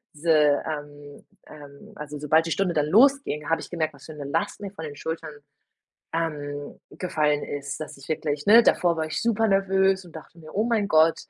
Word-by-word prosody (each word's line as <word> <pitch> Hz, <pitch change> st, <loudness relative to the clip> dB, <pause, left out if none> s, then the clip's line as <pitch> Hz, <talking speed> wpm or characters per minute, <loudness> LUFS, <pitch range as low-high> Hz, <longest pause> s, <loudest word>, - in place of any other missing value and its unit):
diese, 165 Hz, +2 st, 0 dB, 0.4 s
ähm 145 Hz, -1 st, -8 dB, 0.2 s
ähm, 145 Hz, -2 st, -13 dB
also, 150 Hz, -1 st, -7 dB
sobald 155 Hz, +2 st, +3 dB
die 165 Hz, -, -4 dB
Stunde 180 Hz, +1 st, 0 dB
dann 150 Hz, -1 st, +2 dB
losging, 225 Hz, -, +3 dB
habe 165 Hz, -, +2 dB
ich -, -, -9 dB
gemerkt, 155 Hz, -4 st, -2 dB
was 140 Hz, -, -16 dB
für 155 Hz, -, -9 dB
'ne 145 Hz, -2 st, -8 dB
Last 205 Hz, +10 st, -2 dB
mir 200 Hz, -, -5 dB
von 160 Hz, -5 st, -8 dB
den 145 Hz, -1 st, -8 dB
Schultern, 160 Hz, +1 st, -5 dB, 0.8 s
ähm, 145 Hz, -3 st, -4 dB
gefallen 150 Hz, -5 st, 0 dB
ist, 140 Hz, 0 st, -5 dB
dass 155 Hz, -, -7 dB
ich 135 Hz, -, -14 dB
wirklich 150 Hz, -2 st, -2 dB
ne, 230 Hz, +3 st, +8 dB
davor 170 Hz, -2 st, +3 dB
war 160 Hz, 0 st, -1 dB
ich 155 Hz, -, -3 dB
super 225 Hz, -1 st, +2 dB
nervös 195 Hz, -1 st, +2 dB
und 165 Hz, -2 st, -12 dB
dachte 165 Hz, +2 st, -13 dB
mir: 155 Hz, 0 st, -12 dB
„Oh 215 Hz, +3 st, +1 dB
mein 220 Hz, -4 st, 0 dB
Gott, 160 Hz, -1 st, +4 dB
160 Hz, 200 wpm, -25 LUFS, 145-190 Hz, 0.8 s, ne